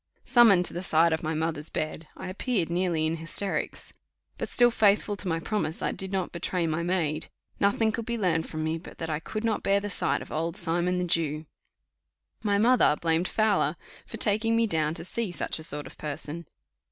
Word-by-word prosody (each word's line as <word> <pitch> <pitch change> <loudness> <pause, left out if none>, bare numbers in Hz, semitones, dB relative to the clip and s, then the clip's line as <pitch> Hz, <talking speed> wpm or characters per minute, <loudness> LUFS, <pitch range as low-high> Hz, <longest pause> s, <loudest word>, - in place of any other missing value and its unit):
Summoned 225 -8 +6
to - - +2
the 175 - -3
side 165 -2 +3
of 160 - -1
my 160 0 -2
mother's 160 -1 -2
bed, 155 0 -4
I - - -6
appeared 185 -2 -1
nearly 170 -3 +1
in 160 +1 -1
hysterics 165 +5 -2 0.5
but - - -3
still 240 0 +5
faithful 205 -1 +3
to 195 - -4
my 165 -1 0
promise, 165 -3 -2
I - - +1
did 190 0 -3
not 190 -2 -1
betray 170 0 -2
my 160 +1 -1
maid; 165 -3 -1 0.3
nothing 220 +2 +2
could 225 0 -4
be 235 0 -1
learned 165 -6 0
from 155 -1 -4
me 160 +1 -1
but 170 - -12
that 165 -1 -4
I 150 - -1
could 215 +6 -5
not 225 -2 0
bear 200 0 +2
the 205 0 -5
sight - - 0
of - - -14
Old 165 +2 -2
Simon 175 +2 +1
the 180 - 0
Jew. 160 -2 -1 1.0
My 205 -2 +1
mother 235 -7 +4
blamed 165 +1 +1
Fowler 210 -7 +2 0.3
for 225 - -7
taking 220 +1 +2
me 230 0 +3
down 160 -5 0
to - - -6
see 230 +2 -2
such 170 - -1
a - - -6
sort 150 -2 -1
of - - -10
a - - -24
person. 150 +2 -4
175 Hz, 215 wpm, -27 LUFS, 160-205 Hz, 1.0 s, Summoned